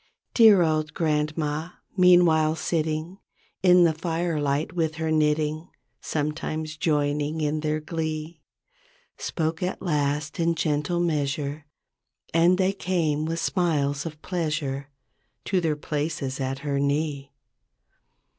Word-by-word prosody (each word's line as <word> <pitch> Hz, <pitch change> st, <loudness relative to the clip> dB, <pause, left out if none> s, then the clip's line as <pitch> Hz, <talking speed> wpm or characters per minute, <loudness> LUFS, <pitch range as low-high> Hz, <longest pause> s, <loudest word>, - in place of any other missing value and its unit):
Dear 215 Hz, -6 st, +7 dB
old 155 Hz, -1 st, 0 dB
Grandma, 155 Hz, +1 st, -1 dB, 0.2 s
meanwhile 175 Hz, -4 st, +5 dB
sitting 160 Hz, +3 st, -2 dB, 0.4 s
In 180 Hz, -1 st, +6 dB
the 165 Hz, -2 st, +4 dB
firelight 160 Hz, -3 st, -1 dB
with 160 Hz, -2 st, -1 dB
her 160 Hz, 0 st, -2 dB
knitting. 155 Hz, +1 st, +1 dB, 0.3 s
Sometimes 155 Hz, +1 st, -3 dB
joining 150 Hz, 0 st, 0 dB
in 155 Hz, 0 st, 0 dB
their 155 Hz, 0 st, -1 dB
glee. 155 Hz, 0 st, -4 dB, 0.8 s
Spoke 160 Hz, 0 st, -2 dB
at 180 Hz, +1 st, -2 dB
last 150 Hz, -2 st, -1 dB
in 170 Hz, 0 st, +2 dB
gentle 155 Hz, +2 st, 0 dB
measure 145 Hz, -2 st, -2 dB, 0.7 s
And 170 Hz, +2 st, +4 dB
they 190 Hz, +1 st, +2 dB
came 160 Hz, -6 st, 0 dB
with 165 Hz, +1 st, -2 dB
smiles 150 Hz, -7 st, 0 dB
of 155 Hz, -2 st, -9 dB
pleasure 150 Hz, -6 st, -2 dB, 0.6 s
To 190 Hz, -3 st, +1 dB
their 160 Hz, -3 st, 0 dB
places 150 Hz, -2 st, -3 dB
at 135 Hz, 0 st, -2 dB
her 140 Hz, -1 st, 0 dB
knee. 140 Hz, 0 st, -1 dB
155 Hz, 115 wpm, -25 LUFS, 150-165 Hz, 0.8 s, Dear